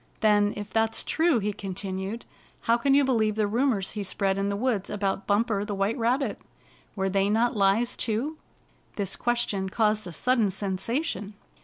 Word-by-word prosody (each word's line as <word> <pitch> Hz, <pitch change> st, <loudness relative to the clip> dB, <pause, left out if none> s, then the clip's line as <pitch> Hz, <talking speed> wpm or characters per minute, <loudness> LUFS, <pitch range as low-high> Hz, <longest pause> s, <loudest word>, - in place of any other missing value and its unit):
" -, -, -32 dB
Then, 205 Hz, -1 st, +3 dB
if 205 Hz, -2 st, -7 dB
that's 225 Hz, 0 st, +1 dB
true," 325 Hz, -4 st, +2 dB
he 210 Hz, -1 st, -1 dB
continued, 195 Hz, +2 st, -5 dB, 0.2 s
" -, -, -31 dB
how 230 Hz, -, +4 dB
can 270 Hz, +3 st, +2 dB
you 285 Hz, -, +5 dB
believe 220 Hz, -5 st, +1 dB
the 215 Hz, -1 st, +1 dB
rumors 225 Hz, -3 st, +1 dB
he 210 Hz, -, -4 dB
spread 195 Hz, 0 st, 0 dB
in 200 Hz, 0 st, 0 dB
the 200 Hz, -, -1 dB
woods 215 Hz, -3 st, -1 dB
about 195 Hz, -1 st, -2 dB
Bumper 205 Hz, 0 st, +1 dB
the 205 Hz, -1 st, -4 dB
White 195 Hz, +3 st, 0 dB
Rabbit? 245 Hz, -1 st, 0 dB, 0.6 s
Were 195 Hz, -1 st, 0 dB
they 195 Hz, +1 st, +1 dB
not 230 Hz, +3 st, +2 dB
lies 210 Hz, +5 st, +2 dB
too?" 245 Hz, +8 st, -2 dB, 0.6 s
This 200 Hz, -3 st, 0 dB
question 215 Hz, -5 st, -1 dB
caused 215 Hz, -1 st, +1 dB
a -, -, -6 dB
sudden 235 Hz, +3 st, +2 dB
sensation. 200 Hz, -, -3 dB
210 Hz, 180 wpm, -26 LUFS, 195-235 Hz, 0.6 s, you